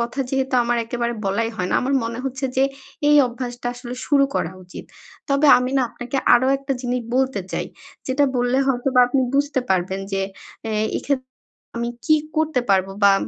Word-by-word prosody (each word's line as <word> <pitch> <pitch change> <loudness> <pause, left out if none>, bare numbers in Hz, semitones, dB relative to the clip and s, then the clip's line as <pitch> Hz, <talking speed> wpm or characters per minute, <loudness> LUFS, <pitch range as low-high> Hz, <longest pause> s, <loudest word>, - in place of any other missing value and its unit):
কথা 240 +3 -2
যেহেতু 265 -1 0
আমার 240 0 +1
একেবারে 235 0 -2
বলাই 225 +4 0
হয় 180 -1 -2
না। - - +1
আমার 270 +2 0
মনে 230 +1 -4
হচ্ছে 265 +1 -3
যে, 265 - +4 0.4
এই 295 - +6
অভ্যাসটা 245 0 -6
আসলে 245 0 -7
শুরু 280 -1 +4
করা 165 +3 -1
উচিত। 180 - -10 0.5
তবে 280 +2 +3
আমি 250 +1 -2
না 265 - +3
আপনাকে 245 +2 -5 0.2
আরো 255 +2 +3
একটা 275 0 -3
জিনিস 250 0 -1 0.2
বলতে 265 -5 +1
চাই। - - -2 0.4
যেটা 275 +2 +2
বললে 245 +2 +1
হয়তোবা 255 0 +2
আপনি 265 +1 +1
বুঝতে 280 -1 +1
পারবেন 190 +1 0
যে, 195 0 0 0.5
এ - - -2
এই - - -1
এক্ষেত 280 -2 -1 0.6
আমি 235 0 -1 0.2
কী 310 -1 +5 0.2
করতে 315 -5 +1
পারবো? 195 0 +2
বা 200 - +8
250 Hz, 185 wpm, -21 LUFS, 235-270 Hz, 0.6 s, বা